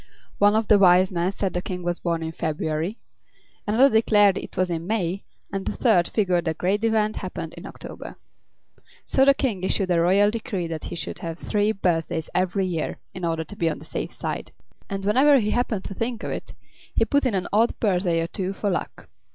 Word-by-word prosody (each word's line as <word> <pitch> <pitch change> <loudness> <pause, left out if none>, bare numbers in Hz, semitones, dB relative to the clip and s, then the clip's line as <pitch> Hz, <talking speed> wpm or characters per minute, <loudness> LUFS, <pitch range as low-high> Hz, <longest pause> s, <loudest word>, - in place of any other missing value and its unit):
One 205 +1 +5
of 220 -1 +1
the 210 - +6
Wise 185 0 +5
Men 175 +1 0
said 195 -1 -2
the 180 - -1
King 180 -1 -5
was 175 0 -2
born 170 -2 -1
in 160 - -3
February; 160 +5 -2 0.7
another 245 +6 +4
declared 205 -3 +4
it - - -7
was 185 -1 +1
in 165 0 -3
May, 195 -3 -1 0.3
and 195 -1 -2
a - - -2
third 185 -9 +3
figured 180 -5 +1
the 160 -1 -1
great 195 +6 0
event 215 -1 +1
happened - - -5
in - - -9
October. - - -9 0.9
So 265 - +3
the 275 0 +6
King 230 -11 -1
issued 185 0 0
a 170 -1 +3
royal 200 +4 +4
decree 215 -5 -3
that 165 -2 -5
he - - -5
should - - -5
have 165 -1 -5
three 210 +2 0
birthdays 165 -5 -1
every 185 +1 +1
year, 170 -4 -2 0.2
in 185 - -8
order 165 -1 0
to 205 - -11
be 165 -4 +1
on 155 - -3
the - - -12
safe - - -4
side; - - -5 0.4
and 195 0 -4
whenever 270 +7 +5
he 210 -4 +1
happened 230 -5 0
to - - -6
think 230 +3 -3
of - - -3
it - - -6 0.4
he - - +3
put 285 0 +2
in 225 - 0
an 185 - -1
odd 225 +3 +2
birthday 180 -5 +1
or 165 - -2
two 190 +1 -3
for 200 0 -1
luck. 175 - -4
190 Hz, 215 wpm, -24 LUFS, 175-215 Hz, 0.9 s, the